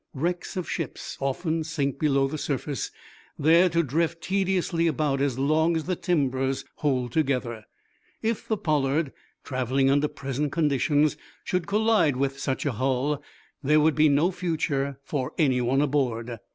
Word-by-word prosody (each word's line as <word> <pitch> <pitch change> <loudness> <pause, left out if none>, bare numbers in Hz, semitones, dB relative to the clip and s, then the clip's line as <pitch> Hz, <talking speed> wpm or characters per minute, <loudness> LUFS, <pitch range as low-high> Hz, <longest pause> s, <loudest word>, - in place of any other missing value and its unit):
Wrecks 175 +6 -2
of 180 - -3
ships 165 -4 -4
often 160 +4 -1
sink 145 -3 -2
below 140 -3 +2
the 150 +2 -5
surface, 140 0 -2 0.5
there 165 +5 +5
to 170 0 +2
drift 165 +3 -1
tediously 185 -3 +1
about 145 -3 0
as 140 -3 0
long 155 +5 +2
as 160 - -2
the 185 +2 -1
timbers 135 -6 0
hold 130 -5 0
together. 125 -7 -1 0.6
If 225 0 -1
the 220 - 0
"Pollard," 150 -3 0 0.3
traveling 130 +1 +1
under 145 +2 +3
present 140 +1 -3
conditions, 150 -1 +2 0.3
should 180 -2 -1
collide 210 - +3
with 135 0 -1
such 135 +1 -2
a 145 - +1
hull, 130 +4 0 0.4
there 150 +2 +4
would 155 +1 +4
be 155 0 +4
no 150 +6 +3
future 150 -6 -1
for 135 -3 -3
anyone 130 -3 +2
aboard. 120 -5 -1
145 Hz, 150 wpm, -26 LUFS, 135-165 Hz, 0.6 s, there